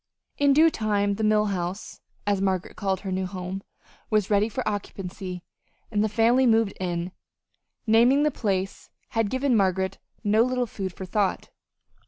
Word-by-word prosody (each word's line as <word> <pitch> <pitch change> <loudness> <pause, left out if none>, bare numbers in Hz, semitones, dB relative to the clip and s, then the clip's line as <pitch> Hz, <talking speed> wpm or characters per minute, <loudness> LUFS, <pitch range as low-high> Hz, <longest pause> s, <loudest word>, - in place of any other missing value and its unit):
In 285 -1 +5
due 320 +3 +6
time 205 -3 0
the 215 +2 -3
Mill 215 0 +3
House, 180 +2 -5 0.2
as 200 -2 +1
Margaret 190 -2 -1
called 190 -2 -1
her 195 - -4
new 185 0 -1
home, 185 +1 -5 0.5
was 215 -2 +1
ready 205 +2 +3
for 215 - -4
occupancy, 185 -3 -5 0.5
and 210 -1 +1
the 215 - +1
family 235 +4 +3
moved 225 -3 +3
in. 175 -1 -2 0.7
Naming 240 +6 +5
the 300 - +2
place 195 -5 -2 0.2
had 225 -2 0
given 260 +1 +1
Margaret 190 -2 +1 0.2
no 215 +1 +3
little 250 +1 +1
food 195 -4 -5
for 190 - -8
thought. 195 +1 -1
205 Hz, 160 wpm, -25 LUFS, 190-225 Hz, 0.7 s, due